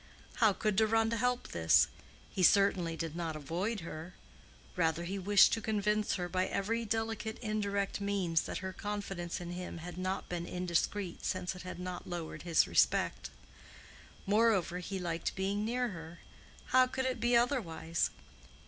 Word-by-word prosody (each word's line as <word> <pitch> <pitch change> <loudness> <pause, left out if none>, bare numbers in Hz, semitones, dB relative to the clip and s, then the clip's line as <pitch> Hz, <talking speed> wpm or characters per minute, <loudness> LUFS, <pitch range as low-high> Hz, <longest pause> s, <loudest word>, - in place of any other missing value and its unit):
How 220 -2 +5
could 210 +1 -1
Deronda 225 +1 +3
help 250 +2 0
this? 80 -1 +4 0.4
He 190 - -2
certainly 185 -3 +4
did 165 -1 -4
not 165 -2 -3
avoid 175 +9 -2
her; 165 +2 -8 0.6
rather 165 -1 +1
he 195 +3 -3
wished 200 +2 +6
to 225 - 0
convince 210 -1 +1
her 180 -2 -2
by 185 +1 0
every 230 +4 -1
delicate 225 0 -2
indirect 205 -3 -1
means 190 -5 +1
that - - -3
her 190 - -4
confidence 195 -4 -4
in 175 -1 -6
him 180 0 -5
had 175 +1 -7
not 185 +1 -2
been 175 -1 -4
indiscreet 180 +1 -1
since 185 0 -2
it 185 - -8
had 185 - -7
not 180 0 -6
lowered 170 -2 -5
his 170 -2 +3
respect. - - +2 1.0
Moreover 205 -4 +3
he 190 +2 -4
liked 170 -2 -2
being 195 +2 -1
near 245 +2 0
her—how 175 +8 -2
could 260 +1 -2
it 260 -1 -1
be 240 0 +4
otherwise? 170 - 0
190 Hz, 155 wpm, -33 LUFS, 175-215 Hz, 1.0 s, wished